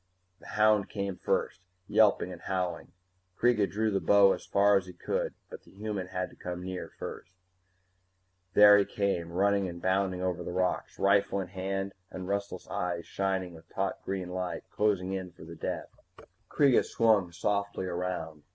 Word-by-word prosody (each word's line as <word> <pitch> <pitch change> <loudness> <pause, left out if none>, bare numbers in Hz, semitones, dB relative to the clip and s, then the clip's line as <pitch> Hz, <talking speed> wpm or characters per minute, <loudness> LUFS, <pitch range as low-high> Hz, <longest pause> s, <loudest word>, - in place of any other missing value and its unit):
The - - -14
hound 105 -2 +4
came 100 -2 -3
first, 90 - -1 0.3
yelping 105 -3 +3
and 85 - -11
howling. 90 -3 -3 0.5
Kreega 115 -5 +3
drew 110 +2 0
the 100 - +1
bow 100 -1 +6
as - - -8
far 100 0 +4
as 95 -1 +1
he 90 - -9
could. 85 - -2 0.2
But - - -8
the - - -20
human 100 -2 -4
had 90 0 -3
to - - -16
come 90 0 -6
near 95 -1 -5
first 90 - -7 1.2
There 105 0 +9
he 100 - +2
came, 95 -5 -1
running 100 +1 +2
and 85 0 -8
bounding 95 0 0
over 90 -1 -1
the 90 - -5
rocks, 90 0 -1
rifle 100 0 +3
in 95 -2 -4
hand 95 +1 -3 0.2
and 95 -1 -7
restless 100 0 -3
eyes 85 -1 -3
shining 95 -2 -2
with 80 - -15
taut - - -3
green 95 -2 -3
light, 90 0 -3
closing 95 -3 +1
in 95 -2 -5
for - - -13
the 85 +1 -9
death. - - -4 0.6
Kreega 140 -4 +4
swung 105 -6 +2
softly 100 +2 -1
around. 85 -4 -4
95 Hz, 170 wpm, -30 LUFS, 90-100 Hz, 1.2 s, There